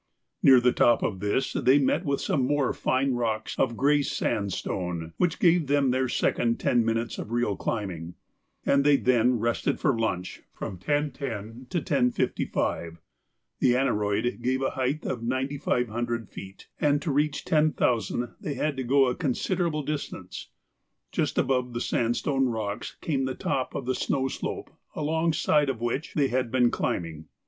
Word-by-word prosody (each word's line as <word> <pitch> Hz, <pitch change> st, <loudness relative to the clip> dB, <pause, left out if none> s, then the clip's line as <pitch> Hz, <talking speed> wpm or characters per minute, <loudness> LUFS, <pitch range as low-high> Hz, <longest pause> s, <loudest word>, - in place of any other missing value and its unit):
Near 130 Hz, -2 st, +8 dB
the 125 Hz, 0 st, +3 dB
top 120 Hz, -1 st, +3 dB
of 95 Hz, -4 st, -1 dB
this 105 Hz, +7 st, 0 dB
they 130 Hz, +3 st, +4 dB
met 145 Hz, +5 st, +1 dB
with 140 Hz, -1 st, 0 dB
some 135 Hz, -, 0 dB
more 145 Hz, -2 st, +1 dB
fine 130 Hz, +1 st, +1 dB
rocks 115 Hz, -3 st, -1 dB
of 120 Hz, -3 st, +1 dB
grey 145 Hz, +2 st, +3 dB
sandstone 90 Hz, -, -2 dB
which 175 Hz, -1 st, +1 dB
gave 170 Hz, -3 st, +3 dB
them 140 Hz, -2 st, +3 dB
their 130 Hz, 0 st, 0 dB
second 115 Hz, -1 st, +1 dB
ten 120 Hz, -2 st, +2 dB
minutes 115 Hz, +1 st, -1 dB
of -, -, -6 dB
real 120 Hz, -4 st, 0 dB
climbing, 90 Hz, -7 st, -4 dB, 0.5 s
and 140 Hz, 0 st, +3 dB
they 145 Hz, -1 st, +5 dB
then 125 Hz, -1 st, +3 dB
rested 115 Hz, +1 st, 0 dB
for 135 Hz, -5 st, +2 dB
lunch 100 Hz, -5 st, -2 dB
from 95 Hz, -, -6 dB
10.10 130 Hz, -, -3 dB
to 175 Hz, -3 st, -1 dB
10.55. 125 Hz, -, 0 dB, 0.6 s
The 125 Hz, -1 st, +4 dB
aneroid 110 Hz, -2 st, 0 dB
gave 130 Hz, +2 st, 0 dB
a -, -, 0 dB
height 135 Hz, +4 st, -2 dB
of 120 Hz, -, -3 dB
9,500 120 Hz, -3 st, -1 dB
feet, 95 Hz, 0 st, -10 dB
and 145 Hz, -1 st, +3 dB
to 155 Hz, -, -1 dB
reach 145 Hz, +1 st, 0 dB
10,000 140 Hz, -7 st, +1 dB
they 145 Hz, -, -4 dB
had 150 Hz, -1 st, -1 dB
to 130 Hz, -, -2 dB
go 135 Hz, +2 st, +4 dB
a 125 Hz, -, +1 dB
considerable 160 Hz, +3 st, -1 dB
distance. 135 Hz, -11 st, -5 dB, 0.6 s
Just -, -, -1 dB
above 125 Hz, -2 st, +1 dB
the 120 Hz, -, -2 dB
sandstone 125 Hz, +4 st, 0 dB
rocks 110 Hz, -3 st, -4 dB
came 135 Hz, -4 st, 0 dB
the 130 Hz, -1 st, -3 dB
top 130 Hz, -1 st, -2 dB
of 135 Hz, -, -3 dB
the 130 Hz, -, 0 dB
snow 135 Hz, +1 st, 0 dB
slope -, -, -5 dB, 0.2 s
alongside 155 Hz, -1 st, +1 dB
of 130 Hz, -4 st, -2 dB
which 120 Hz, +6 st, -3 dB
they 140 Hz, -3 st, +2 dB
had 130 Hz, -1 st, 0 dB
been 125 Hz, 0 st, +3 dB
climbing. 80 Hz, -3 st, -3 dB
130 Hz, 160 wpm, -27 LUFS, 115-140 Hz, 0.6 s, Near